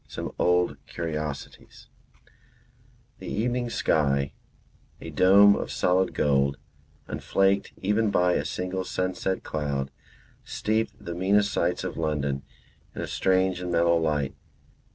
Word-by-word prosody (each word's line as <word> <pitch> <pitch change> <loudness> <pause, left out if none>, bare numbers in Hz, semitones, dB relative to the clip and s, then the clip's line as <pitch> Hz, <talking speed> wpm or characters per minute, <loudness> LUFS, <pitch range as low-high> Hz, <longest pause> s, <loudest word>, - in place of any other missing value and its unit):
SOME - - -5
OLD 90 0 +2
CURIOSITIES 75 -4 -6 1.3
The - - -9
evening 120 +2 -1
sky, 70 -9 +1 0.7
a - - -8
dome 100 +2 +6
of - - -4
solid 90 +1 +1
gold, 70 -1 +2 0.5
unflaked 95 0 +1
even 105 +2 +2
by 90 -2 +3
a - - 0
single 90 +1 -3
sunset 95 +1 -2
cloud, 70 -3 -3 0.5
steeped 110 -1 -1
the 85 - -4
meanest 100 +3 +2
sights 90 +2 0
of 90 - -5
London 75 -4 -1 0.5
in - - -4
a - - -2
strange 95 -1 +1
and 90 -1 -3
mellow 85 0 +3
light. 75 -4 0
90 Hz, 120 wpm, -26 LUFS, 75-95 Hz, 1.3 s, dome